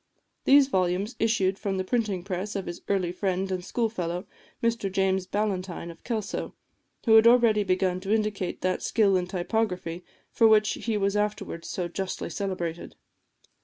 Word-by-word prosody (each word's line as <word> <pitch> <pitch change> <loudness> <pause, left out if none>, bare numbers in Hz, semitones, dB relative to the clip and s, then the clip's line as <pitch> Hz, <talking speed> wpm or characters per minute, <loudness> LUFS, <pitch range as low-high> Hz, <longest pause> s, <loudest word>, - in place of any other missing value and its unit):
These 275 0 +7
volumes 190 0 0
issued 200 -4 +1
from 195 -3 -2
the 185 - 0
printing 205 -4 -1
press 195 +2 -4
of 195 - -3
his 175 - -6
early 190 -3 +1
friend 190 +1 -1
and 185 -1 -2
school 230 +5 0
fellow, 180 -3 -4 0.4
Mr 230 -4 0
James 190 -1 +1
Ballantyne 185 -4 -2
of 165 - -17
Kelso, 215 -4 -3 0.5
who 225 - +5
had 220 +1 +7
already 235 -3 +5
begun 185 -1 +1
to 195 +2 -4
indicate 210 -4 -1
that 185 0 0
skill 205 -4 +3
in 180 -1 0
typography 180 -2 -2 0.3
for 225 - +5
which 215 -1 +5
he 225 -2 -2
was 200 0 0
afterwards 210 -5 -2
so 180 -2 -2
justly 190 +2 -4
celebrated. 175 -4 -4
195 Hz, 165 wpm, -27 LUFS, 185-215 Hz, 0.5 s, These